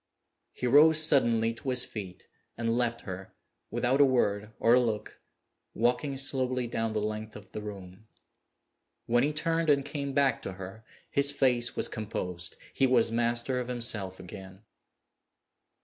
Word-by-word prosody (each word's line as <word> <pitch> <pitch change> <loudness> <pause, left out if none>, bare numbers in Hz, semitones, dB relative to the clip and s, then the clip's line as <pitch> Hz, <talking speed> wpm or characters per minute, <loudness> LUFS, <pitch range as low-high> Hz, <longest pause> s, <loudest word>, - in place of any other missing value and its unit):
He - - -5
rose 150 +5 +6
suddenly 120 -7 +4
to 125 +3 -6
his 125 -1 +2
feet 95 -4 -8 0.3
and 115 0 0
left 120 -1 0
her, 95 0 -8 0.3
without 130 +3 +1
a - - +9
word 105 -6 +1
or 115 - +4
a 125 - +6
look, 110 -4 -3 0.5
walking 125 +4 0
slowly 130 -2 0
down 115 -1 -2
the 110 - 0
length 110 0 -4
of 105 -1 -12
the 105 - -6
room. 100 0 -10 1.0
When 120 +1 +2
he 145 - +1
turned 165 +1 -1
and 140 -2 +3
came 140 -1 -4
back 135 -4 +2
to 95 - -6
her, 95 +4 -10 0.3
his 140 0 +3
face 125 -4 +1
was - - +2
composed; 90 -6 -5 0.2
he 135 - +3
was 120 -3 +3
master 120 +2 0
of 125 - -4
himself 115 -6 -1
again. 95 +2 -11
120 Hz, 155 wpm, -29 LUFS, 105-135 Hz, 1.0 s, a